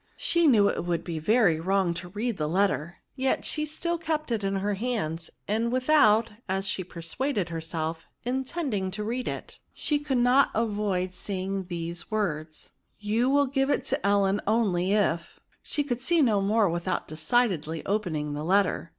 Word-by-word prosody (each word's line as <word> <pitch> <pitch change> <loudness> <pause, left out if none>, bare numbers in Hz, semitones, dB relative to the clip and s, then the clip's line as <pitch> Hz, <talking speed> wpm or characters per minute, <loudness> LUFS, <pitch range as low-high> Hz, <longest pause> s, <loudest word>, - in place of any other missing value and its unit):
She 340 -1 +3
knew 215 -7 +5
it - - -1
would 170 -1 -1
be 165 -3 -4
very 200 -1 +3
vnrong 190 0 +1
to 180 - -6
read 215 +3 -2
the 150 -1 -1
letter, 175 -2 +1 0.2
yet 265 0 0
she 305 -1 +1
still 340 +3 -2
kept 310 -4 -2
it 220 -3 0
in 195 0 0
her 200 +2 0
hands; 195 -8 -2 0.2
and 225 +3 0
without, 245 -4 +4 0.2
as 195 +1 -1
she 190 0 -2
persuaded 185 - -3
herself, 160 0 -4 0.2
intending 255 - -2
to 210 +3 -4
read 245 +4 -3
it, - - -6 0.2
she 295 -1 0
could 290 -3 -1
not 250 +3 +5
avoid 205 -5 0
seeing 190 0 -3
these 170 0 -5
words, 155 -8 -3 0.3
you 220 +4 +1
will 285 +1 +4
give 270 0 0
it - - +1
to 270 +1 -1
Ellen 200 0 +2
only, 195 -5 +2
if—." 170 -5 0 0.2
she 290 - -1
could 250 -4 -3
see 330 +3 +3
no 215 -6 +3
more 210 +1 +3
vnthout 175 +2 -2
decidedly 165 -2 0
open 200 -5 -1
ing 150 -1 -3
the 145 +1 -4
letter. 185 -1 +1
205 Hz, 175 wpm, -27 LUFS, 175-245 Hz, 0.3 s, knew